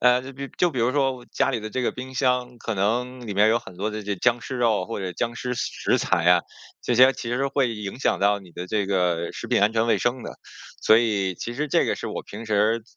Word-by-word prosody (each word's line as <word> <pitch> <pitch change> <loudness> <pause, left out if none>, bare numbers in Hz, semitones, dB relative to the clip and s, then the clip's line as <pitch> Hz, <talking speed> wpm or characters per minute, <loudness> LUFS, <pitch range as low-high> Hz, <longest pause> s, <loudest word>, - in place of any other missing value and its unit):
呃， 125 0 +5
就 130 +2 -9
比 140 +1 -6
就 180 - +3
比 130 - -5
如 120 +2 +3
说 135 -3 0
家 - - +1
里 120 -4 -2
的 110 0 -6
这 130 - -2
个 125 - 0
冰 130 +1 -8
箱 125 -2 0
可 115 - -3
能 120 +5 -1
里 105 - -3
面 105 +2 +4
有 115 +2 +3
很 95 - -13
多 100 +4 -2
的 110 0 -5
这 100 0 -3
僵 120 +5 +2
尸 130 - -5
肉 115 -6 +2
或 115 - -5
者 95 -2 -4
僵 120 +6 -2
尸 125 +1 -3
食 - - 0
材 85 - +1
啊， 90 -1 +6 0.4
这 120 - 0
些 130 +3 +7
其 115 - -5
实 135 +3 0
会 135 -3 +1
影 105 +1 -6
响 - - +1
到 100 +1 +3
你 95 -2 -15
的 90 +2 -7
这 105 +2 0
个 90 -3 0
食 - - -7
品 - - +2
安 105 +2 +4
全 110 0 +1
卫 115 - +3
生 120 +1 -1
的， - - -6 0.5
所 110 - +6
以 100 -5 0
其 120 - -5
实 150 +4 -2
这 - - +2
个 - - +1
是 - - -6
我 - - -4
平 110 +3 -9
时 110 +1 +1
115 Hz, 285 characters per minute, -24 LUFS, 100-125 Hz, 0.5 s, 些